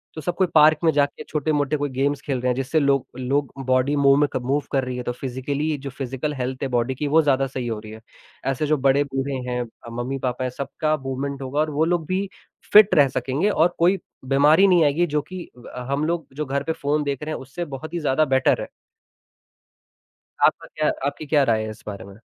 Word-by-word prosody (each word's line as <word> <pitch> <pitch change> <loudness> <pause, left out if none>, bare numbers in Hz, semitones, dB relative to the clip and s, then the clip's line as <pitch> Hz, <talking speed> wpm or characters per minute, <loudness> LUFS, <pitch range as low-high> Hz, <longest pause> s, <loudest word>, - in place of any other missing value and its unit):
तो 155 - -5
सब 175 +4 -2
कोई 185 0 +2
पार्क 155 0 +6
में 165 - +5
जाके 145 0 0
छोटे-मोटे 150 -1 0
कोई 145 0 -2
गेम्स 135 +2 0
खेल 135 -4 -2
रहे 125 - +1
हैं 125 - +1
जिससे 135 +5 0
लोग 140 -3 +2
लोग 135 +2 -1 0.2
बॉडी 130 +3 +2
मूव 140 -1 +5
में 145 - +4
क - - 0
मूव 140 +3 +1
कर 135 -1 +1
रही 125 -1 -4
है, 125 - -4
तो 120 - -2
फ़िज़िकली 140 +4 -3
जो 140 0 -7
फ़िज़िकल 135 +2 -4
हेल्थ 130 -1 -4
है - - 0
बॉडी 120 +1 0
की 145 +3 -2
वो 160 +3 +5
ज़्यादा 135 -2 +2
सही 130 -2 -5
हो 110 -2 -3
रही 110 0 -10
है, 110 0 -11 0.4
ऐसे 135 +3 0
जो 155 +1 +2
बड़े-बूढ़े 135 0 +1 0.2
हैं 125 0 -1 0.3
अ, - - -6
मम्मी-पापा 125 +1 -3
हैं, 130 - -1
सबका 155 +4 -2
मूवमेंट 135 0 -4
होगा 135 +2 -3
और 155 - 0
वो 150 +2 +1
लोग 170 -1 0
भी 190 +1 -1 0.4
फ़िट 210 -1 +8
रह 145 -2 +6
सकेंगे 140 +9 0
और 175 -3 +2
कोई 180 +3 +3 0.3
बीमारी 145 +8 +5
नहीं 180 -3 +5
आएगी 150 +5 +2
जो 150 -1 0
कि 180 +5 -8 0.3
अ, - - -5
हम 145 +2 0
लोग 170 -1 -2
जो 150 +2 -3
घर 140 +1 -2
पे 160 - -2
फ़ोन 150 -1 -1
देख 140 0 -3
रहे 155 +1 -3
हैं - - -7
उससे 135 +7 -6
बहुत 155 +5 -8
ही 175 - -1
ज़्यादा 150 0 +2
बेटर 130 -2 +2
है। - - -5 1.8
आपका - - 0
क्या 155 0 +2 0.2
आपकी 145 +2 -4
क्या 145 0 +3
राय 110 -1 +1
है 110 - -5
इस 110 +2 -11
बारे 100 -2 -6
में? 100 +2 -14
140 Hz, 230 wpm, -23 LUFS, 130-155 Hz, 1.8 s, फ़िट